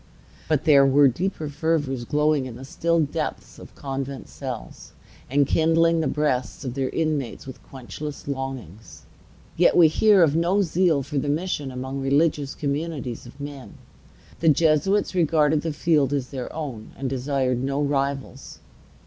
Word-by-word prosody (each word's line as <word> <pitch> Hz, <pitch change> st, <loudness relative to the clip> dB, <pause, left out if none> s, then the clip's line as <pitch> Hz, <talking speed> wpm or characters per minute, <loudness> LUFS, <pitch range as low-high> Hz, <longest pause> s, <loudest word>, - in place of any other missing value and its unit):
But 155 Hz, -3 st, +1 dB
there 140 Hz, -3 st, +6 dB
were 140 Hz, +1 st, +5 dB
deeper 160 Hz, +4 st, -2 dB
fervors, 145 Hz, -4 st, -1 dB
glowing 150 Hz, 0 st, +1 dB
in 120 Hz, -, -8 dB
the 130 Hz, +2 st, -9 dB
still 170 Hz, +4 st, 0 dB
depths 145 Hz, -, -4 dB
of -, -, -13 dB
convent 135 Hz, 0 st, -5 dB
cells, 130 Hz, -4 st, -8 dB, 0.4 s
and 140 Hz, +2 st, +3 dB
kindling 165 Hz, +2 st, +3 dB
the 160 Hz, -, 0 dB
breasts 140 Hz, -3 st, -1 dB
of 125 Hz, -, -3 dB
their 135 Hz, -1 st, -1 dB
inmates 155 Hz, -6 st, -2 dB
with 130 Hz, -1 st, -10 dB
quenchless 140 Hz, +3 st, -8 dB
longings. 130 Hz, -, -6 dB, 0.5 s
Yet 175 Hz, -, +4 dB
we 165 Hz, -3 st, +7 dB
hear 205 Hz, +2 st, +5 dB
of 155 Hz, -2 st, +2 dB
no 175 Hz, +5 st, +2 dB
zeal 170 Hz, -4 st, +2 dB
for 140 Hz, +1 st, -2 dB
the 145 Hz, -, -2 dB
mission 150 Hz, -2 st, -2 dB
among 130 Hz, +2 st, -5 dB
religious 140 Hz, 0 st, +1 dB
communities 140 Hz, -4 st, -4 dB
of 125 Hz, -, -15 dB
men. 140 Hz, -2 st, -8 dB, 0.6 s
The 165 Hz, -, +3 dB
Jesuits 160 Hz, +7 st, +2 dB
regarded 155 Hz, -3 st, +2 dB
the 165 Hz, -, -2 dB
field 150 Hz, -3 st, +1 dB
as 135 Hz, -3 st, -2 dB
their 130 Hz, -3 st, -6 dB
own, 135 Hz, -9 st, -7 dB
and 135 Hz, -, -3 dB
desired 130 Hz, -1 st, -1 dB
no 135 Hz, +1 st, -1 dB
rivals. 140 Hz, -1 st, -2 dB
145 Hz, 155 wpm, -24 LUFS, 135-160 Hz, 0.6 s, we